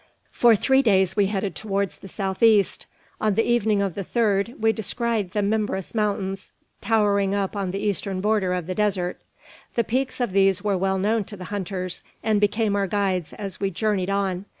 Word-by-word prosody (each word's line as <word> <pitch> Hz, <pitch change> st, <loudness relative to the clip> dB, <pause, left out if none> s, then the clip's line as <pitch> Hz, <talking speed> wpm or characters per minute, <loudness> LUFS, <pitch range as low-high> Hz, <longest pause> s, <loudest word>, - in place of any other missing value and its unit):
For 235 Hz, -2 st, +5 dB
three 265 Hz, +6 st, +3 dB
days 190 Hz, -7 st, +3 dB
we 205 Hz, -2 st, +3 dB
headed 195 Hz, -1 st, -2 dB
towards 200 Hz, -2 st, -2 dB
the -, -, -11 dB
south 190 Hz, 0 st, -4 dB
east. 220 Hz, -4 st, +3 dB, 0.3 s
On 215 Hz, -2 st, +2 dB
the 225 Hz, -, +3 dB
evening 220 Hz, -4 st, +2 dB
of 195 Hz, -3 st, -2 dB
the 200 Hz, -, -4 dB
third 215 Hz, +1 st, 0 dB
we 220 Hz, 0 st, +3 dB
descried 225 Hz, -2 st, -1 dB
the 205 Hz, +2 st, -1 dB
Mimbres 205 Hz, -2 st, -1 dB
Mountains 200 Hz, -3 st, -2 dB, 0.3 s
towering 200 Hz, -3 st, +2 dB
up 200 Hz, 0 st, -1 dB
on 195 Hz, -2 st, -2 dB
the 190 Hz, -, -3 dB
eastern 200 Hz, -2 st, -2 dB
border 205 Hz, -2 st, +1 dB
of 180 Hz, -2 st, -3 dB
the 185 Hz, -, -3 dB
desert. 190 Hz, -3 st, -1 dB, 0.5 s
The 235 Hz, -, +2 dB
peaks 255 Hz, +4 st, -2 dB
of 240 Hz, -5 st, 0 dB
these 195 Hz, 0 st, +3 dB
were 205 Hz, -2 st, +1 dB
well 190 Hz, +1 st, 0 dB
known 215 Hz, +3 st, +1 dB
to 205 Hz, -, -9 dB
the 185 Hz, -, -8 dB
hunters, 185 Hz, -2 st, -3 dB, 0.2 s
and 215 Hz, -2 st, +2 dB
became 210 Hz, 0 st, +1 dB
our 200 Hz, -1 st, +1 dB
guides 190 Hz, -4 st, -1 dB
as 195 Hz, -3 st, -6 dB
we 195 Hz, -, 0 dB
journeyed 195 Hz, 0 st, -1 dB
on. 195 Hz, -1 st, -1 dB
200 Hz, 195 wpm, -24 LUFS, 190-215 Hz, 0.5 s, For